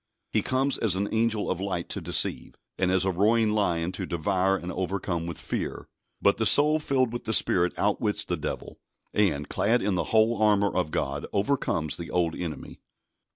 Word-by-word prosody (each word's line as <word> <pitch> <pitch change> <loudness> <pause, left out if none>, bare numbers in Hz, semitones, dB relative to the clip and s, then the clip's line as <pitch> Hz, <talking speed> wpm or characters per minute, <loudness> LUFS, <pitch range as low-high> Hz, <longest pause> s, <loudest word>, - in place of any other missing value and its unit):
He 110 - +2
comes 130 +5 0
as 105 -5 +1
an 100 +2 -1
angel 110 -1 +1
of 95 - -3
light 95 -3 -3
to - - -4
deceive, - - -1 0.2
and 95 -1 0
as 95 0 +2
a 95 - +2
roaring 110 +5 +3
lion 90 -5 0
to 95 0 -5
devour 95 +3 +1
and 90 0 -6
overcome 90 -2 -3
with 85 - -5
fear; - - -4 0.3
but 100 - +3
the 110 - 0
soul 150 +7 +4
filled 130 -5 0
with 120 - -5
the 110 - -1
Spirit 90 -1 +2
outwits - - +1
the - - -1
Devil, - - -6 0.3
and, 75 -9 +1
clad 115 +4 +1
in 105 - +1
the 90 - 0
whole 110 +1 +2
armour 100 -2 +3
of 90 -4 0
God, - - -2
overcomes 100 - 0
the 85 -1 -7
old 85 -2 0
enemy. 80 -5 -6
100 Hz, 190 wpm, -26 LUFS, 90-110 Hz, 0.3 s, soul